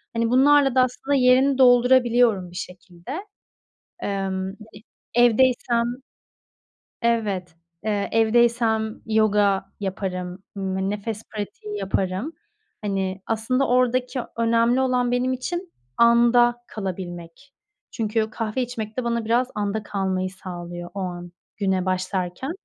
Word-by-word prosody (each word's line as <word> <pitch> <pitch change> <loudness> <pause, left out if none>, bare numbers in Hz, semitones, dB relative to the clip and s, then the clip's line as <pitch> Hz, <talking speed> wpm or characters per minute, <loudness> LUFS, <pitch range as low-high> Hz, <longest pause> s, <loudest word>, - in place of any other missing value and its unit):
Hani, 230 0 +1
bunlarla 275 +1 +5
da 260 - +6
aslında 270 +3 -1
yerini 260 +1 +4
doldurabiliyorum 245 -6 +4
bir - - -14
şekilde. 180 +2 -9 0.9
Emm, 190 -1 -2
yani, 190 - -7 0.6
evdeysem 240 0 +3 1.2
Evet. 205 -7 -1 0.3
Eee, 205 -2 -1
evdeysem 225 -1 +2
yoga 210 -3 +2
yaparım, 185 -2 -4
ımm, 190 0 -2
nefes 210 +1 -4
pratiği 210 0 -5
yaparım. 195 - -2 0.5
Hani, 195 -2 -2
aslında 240 +5 0
oradaki 250 +1 +1 0.2
önemli 230 +2 +3
olan 250 -2 +1
benim 250 +1 +1
için 345 +7 -5 0.2
anda 240 +1 +5
kalabilmek. 185 +4 -7 0.4
Çünkü 220 -1 -1
kahve 225 +3 -2
içmek 225 -3 -5
de 255 - -1
bana 235 -1 -1
biraz 240 +3 +2
anda 210 +1 -2
kalmayı 190 -2 -2
sağlıyor 175 -2 -8
o 200 - -5
an 175 -2 -5 0.3
güne 190 -2 0
başlarken. 185 - -2
220 Hz, 110 wpm, -23 LUFS, 190-245 Hz, 1.2 s, da